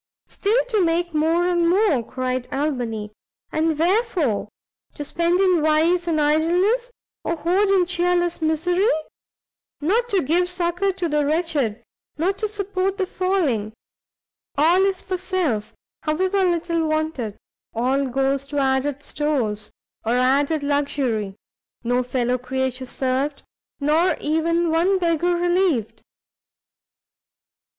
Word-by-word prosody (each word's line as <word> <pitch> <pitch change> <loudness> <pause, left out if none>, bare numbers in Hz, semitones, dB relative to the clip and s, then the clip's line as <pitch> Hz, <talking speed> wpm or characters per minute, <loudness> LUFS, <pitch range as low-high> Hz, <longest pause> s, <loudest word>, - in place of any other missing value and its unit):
"Still 420 +4 0
to 430 -5 +2
make 340 0 0
more 325 +3 +2
and 345 -1 +2
more," 370 - +3
cried 255 +1 -3
Albany, 245 -7 -2 0.4
"and 315 0 0
wherefore? 345 - +1 0.5
to 295 - -5
spend 340 +4 0
in 365 -4 +3
vice 325 +3 +2
and 320 -2 +1
idleness, 350 +11 +2 0.3
or 335 - -1
hoard 365 +6 +1
in 380 -2 +4
chearless 350 -1 0
misery! 350 +5 +1 0.9
not 445 +11 +1
to 390 -5 +1
give 350 +6 +1
succour 360 +2 0
to 360 -2 -2
the 300 -1 +1
wretched, 295 -7 0 0.3
not 375 +5 0
to 430 - 0
support 395 -2 -2
the 385 - 0
falling; 335 - -1 0.8
all 335 +6 +4
is 385 -2 -1
for 370 -1 -3
self, 345 - -1 0.3
however 375 +5 +1
little 335 -2 0
wanted, 310 -9 -2 0.4
all 265 +4 +1
goes 270 +2 0
to 290 - -5
added 270 +1 0
stores, 245 -11 -2 0.3
or 230 - 0
added 280 +5 +2
luxury; 275 -8 -1 0.5
no 245 +1 +1
fellow 250 0 -1
creature 260 0 -3
served, 265 +3 -2 0.4
nor 310 +5 +2
even 330 +2 +1
one 350 +4 +3
beggar 345 0 +1
relieved!" 350 - 0
320 Hz, 125 wpm, -22 LUFS, 270-360 Hz, 0.9 s, in